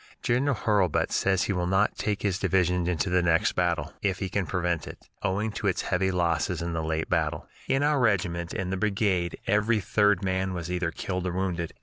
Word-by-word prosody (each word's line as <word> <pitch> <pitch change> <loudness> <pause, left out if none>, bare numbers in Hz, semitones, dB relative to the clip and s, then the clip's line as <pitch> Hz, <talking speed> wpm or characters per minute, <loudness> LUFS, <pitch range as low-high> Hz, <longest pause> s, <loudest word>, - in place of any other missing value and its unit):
General 135 +3 +2
Hurlbut 100 -6 +1
says 95 -1 +2
he 100 - -1
will 90 -1 -1
not 95 +3 +2
take 105 -2 -2
his 95 -3 0
division 90 -2 +1
into 90 +2 0
the 90 0 +2
next 85 -1 +3
battle, 85 -3 -1
if 95 -3 0
he 95 -1 -3
can 95 -2 -1
prevent 85 +1 -1
it, - - -11
owing 100 +4 -1
to 110 0 -3
its 95 - 0
heavy 95 +1 +1
losses 85 -2 0
in 85 0 -3
the 80 - -1
late 80 0 -1
battle. - - -1 0.2
In 135 +1 +2
our 150 -1 +2
regiment 90 -7 +1
and 95 0 -3
the - - -1
brigade 100 -4 0
every 105 +2 +2
third 105 -1 +2
man 95 0 -1
was 85 0 -4
either 90 -2 0
killed 90 +2 -3
or 90 - -2
wounded. 90 -3 -2
95 Hz, 210 wpm, -27 LUFS, 85-100 Hz, 0.2 s, next